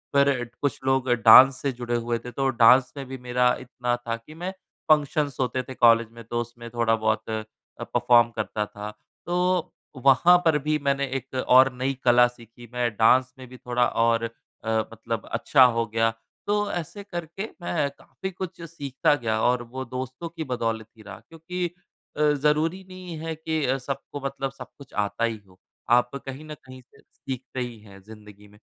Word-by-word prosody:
फिर 135 -4 +3
कुछ 145 - -1
लोग 130 -1 +1
डांस 125 +3 +8
से 140 - 0
जुड़े 120 -1 -3
हुए 120 0 -1
थे, 125 +1 -9
तो 135 +1 0
डांस 125 +1 +5
में 135 - -5
भी 130 0 -6
मेरा 125 0 +2
इतना 120 -1 -2
था 115 -1 -4
कि 115 +7 -14
मैं 180 +3 -4 0.4
फंक्शन्स 145 -2 +2
होते 130 0 -1
थे 130 - -9
कॉलेज 115 -2 +5
में, 115 0 -12
तो 120 +1 -2
उसमें 120 0 -9
थोड़ा-बहुत 115 -2 0
अ, 110 -1 -2 0.4
परफ़ॉर्म 120 -1 +4
करता 105 -1 -2
था। 105 +1 -8 0.3
तो 180 0 0 0.3
वहाँ 175 +7 +7
पर 160 -2 +4
भी 155 +2 0
मैंने 140 0 +1
एक 135 +1 -10
और 130 +1 +7
नई 130 +2 -1
कला 120 0 +6
सीखी। 120 0 -14
मैं 120 -1 +1
डांस 125 +4 +4
में 130 - -10
भी 125 - -12
थोड़ा 125 0 0
और 115 0 +1 0.4
अ, 110 - -4 0.2
मतलब 115 0 -5
अच्छा 135 -3 +4
हो 115 - +1
गया। 115 +1 +1 0.4
तो 205 0 +1
ऐसे 175 +4 -5
करके 175 0 -6 0.2
मैं 150 -5 -1
काफ़ी 190 +6 -8
कुछ 180 -1 -7
सीखता 145 -4 0
गया 110 -4 -1
और 125 0 +2
वो 130 0 -4
दोस्तों 130 +6 -6
की 165 -1 -6
बदौलत 115 -4 -2
ही - - -14
रहा। 100 -2 -10
क्योंकि 175 +2 -4 0.5
अ, - - -1
ज़रूरी 155 +6 +1
नहीं 185 -3 -8
है 160 0 -4
कि 160 0 -2 0.2
सबको 140 +2 -6
मतलब 135 0 -3
सब 130 -2 -10
कुछ 140 -2 -15
आता 105 +3 -1
ही 115 -1 0
हो। 95 0 -22 0.3
आप 125 +2 +3
कहीं 135 +2 -8
न 155 - -7
कहीं 130 0 -12
से 125 - -25
सीखते 130 -1 -8
ही 120 -3 -5
हैं 100 -2 -15
ज़िंदगी 105 -1 -14
में। 105 +1 -20
125 Hz, 185 wpm, -25 LUFS, 115-145 Hz, 0.5 s, डांस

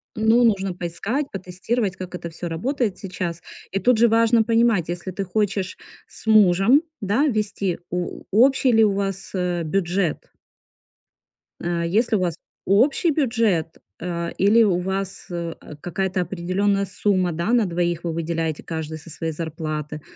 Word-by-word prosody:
Ну, 225 +2 +4
нужно 195 -5 +2
поискать, 195 - -3
потестировать, 195 +3 -2
как 185 -1 -8
это 170 -1 -6
всё 170 +1 -6
работает 220 - -1
сейчас. 180 -3 -5 0.3
И 195 - 0
тут 240 +4 +3
же 235 - +6
важно 230 0 +4
понимать, 225 -6 +2
если 175 +2 -4
ты 195 +2 -3
хочешь 195 -1 -1 0.3
с - - -13
мужем, 215 - +5 0.2
да, 210 +10 +2
вести, 205 - -1
о 180 0 -4
общий 255 +3 +4
ли 225 0 +6
у 210 - +4
вас, 195 -1 -3
э, 180 -2 -1
бюджет? 175 0 -1 1.3
А 170 -1 -1
если 220 +6 +2
у - - +2
вас 175 -3 0 0.3
общий 265 - +3
бюджет, 230 - +1 0.3
а, 170 -1 -3
или 210 +4 +5
у 185 -5 +2
вас, 190 +1 -3
э, 170 -1 -4 0.3
какая-то 185 +1 -1
определённая 195 +3 0
сумма, 185 -1 +1
да, 170 +8 -1
на 235 -3 +4
двоих, 175 -1 -1
вы 170 -1 -2
выделяете 165 -1 -2
каждый 160 -1 -5
со 160 +2 -12
своей 165 +1 -3
зарплаты? 155 -1 -4
190 Hz, 150 wpm, -23 LUFS, 170-220 Hz, 1.3 s, же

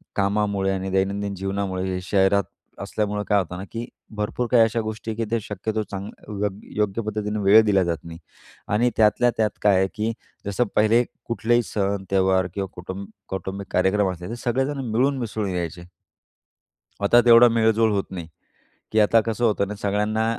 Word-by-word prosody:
कामामुळे 100 -1 +1
आणि 95 0 -2
दैनंदिन 100 +1 -1
जीवनामुळे 95 -1 -2
हे 90 - -2
शहरात 95 +1 +2 0.4
असल्यामुळे 105 -1 -2
काय 105 -1 +3
होतं 90 -1 -4
ना, 95 - -6
की 115 +1 -4 0.3
भरपूर 105 +4 -2
काही 120 -2 +6
अशा 115 +1 0
गोष्टी 110 +1 -5
आहे 110 - -6
की 115 - -1
ते 115 - +2
शक्यतो 110 +2 -3
चांग 100 +1 -5 0.3
यो 105 0 +1 0.3
योग्य 105 +1 0
पद्धतीनं 105 0 -3
वेळ 105 +3 +8
दिला 100 -3 +3
जात 85 -1 -1
नाही 85 0 -9 0.5
आणि 120 +3 +3
त्यातल्या 115 +3 +4
त्यात 110 -2 +2
काय 100 -2 +5
आहे, 95 0 +2
की 110 +1 -1 0.3
जसं 100 +4 0
पहिले 110 +3 +4 0.2
कुठलेही 120 +1 +1
सण, 100 -2 -2
त्यौहार 95 -1 +3
किंवा 100 -1 -3
कुटुंब 95 +2 -7 0.2
कौटुंबिक 95 +1 -5
कार्यक्रम 95 +1 +2
असले 90 +2 -8
ते 115 - -4
सगळेजण 135 +3 0
मिळून-मिसळून 115 -4 0
यायचे. 85 0 -5 1.1
आता 120 +4 +6
तेवढा 120 0 +8
मेळ-जोळ 110 -1 +3
होत 100 -2 0
नाही, 85 -3 -6 0.7
की 110 - +4
आता 110 +2 +5
कसं 115 +2 -1
होतं 100 -3 +1
ना, 105 - -4
सगळ्यांना 105 +2 0
105 Hz, 170 wpm, -23 LUFS, 95-110 Hz, 1.1 s, वेळ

